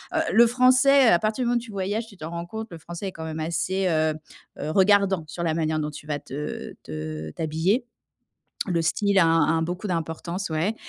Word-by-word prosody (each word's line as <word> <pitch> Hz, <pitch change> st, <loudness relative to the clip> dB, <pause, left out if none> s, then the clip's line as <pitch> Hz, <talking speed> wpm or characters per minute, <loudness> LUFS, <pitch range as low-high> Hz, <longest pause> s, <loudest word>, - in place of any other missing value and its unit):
heu, -, -, +3 dB
le 235 Hz, +1 st, +7 dB
Français, 255 Hz, +2 st, +5 dB
à 175 Hz, -5 st, +5 dB
partir 215 Hz, +4 st, -1 dB
du -, -, 0 dB
moment 240 Hz, 0 st, +2 dB
où -, -, -2 dB
tu 230 Hz, -2 st, -10 dB
voyages, 205 Hz, +4 st, -2 dB
tu 200 Hz, -4 st, -15 dB
t'en 160 Hz, 0 st, -7 dB
rends 170 Hz, 0 st, -5 dB
compte, 220 Hz, +4 st, -6 dB
le 165 Hz, -, -8 dB
Français 175 Hz, +4 st, -6 dB
est -, -, -9 dB
quand 160 Hz, -, -7 dB
même 160 Hz, 0 st, -5 dB
assez, 180 Hz, +4 st, -1 dB
heu 155 Hz, -2 st, +1 dB, 0.4 s
heu, 155 Hz, +2 st, -3 dB
regardant 195 Hz, -2 st, +4 dB
sur 170 Hz, +3 st, -5 dB
la 160 Hz, -2 st, +1 dB
manière 155 Hz, -1 st, 0 dB
dont 150 Hz, 0 st, -2 dB
tu 150 Hz, -, -11 dB
vas 145 Hz, -1 st, -1 dB
te, -, -, -13 dB
heu 150 Hz, +2 st, -5 dB
te, -, -, -11 dB, 0.4 s
heu, -, -, -12 dB
t'habiller. 165 Hz, -, 0 dB, 0.8 s
Le 170 Hz, -2 st, +1 dB
style 200 Hz, +5 st, +2 dB
a 170 Hz, -, +6 dB, 0.3 s
a -, -, 0 dB
beaucoup 180 Hz, +5 st, -4 dB
d'importance, 170 Hz, +2 st, -3 dB
ouais 165 Hz, +8 st, 0 dB
175 Hz, 225 wpm, -25 LUFS, 160-215 Hz, 0.8 s, le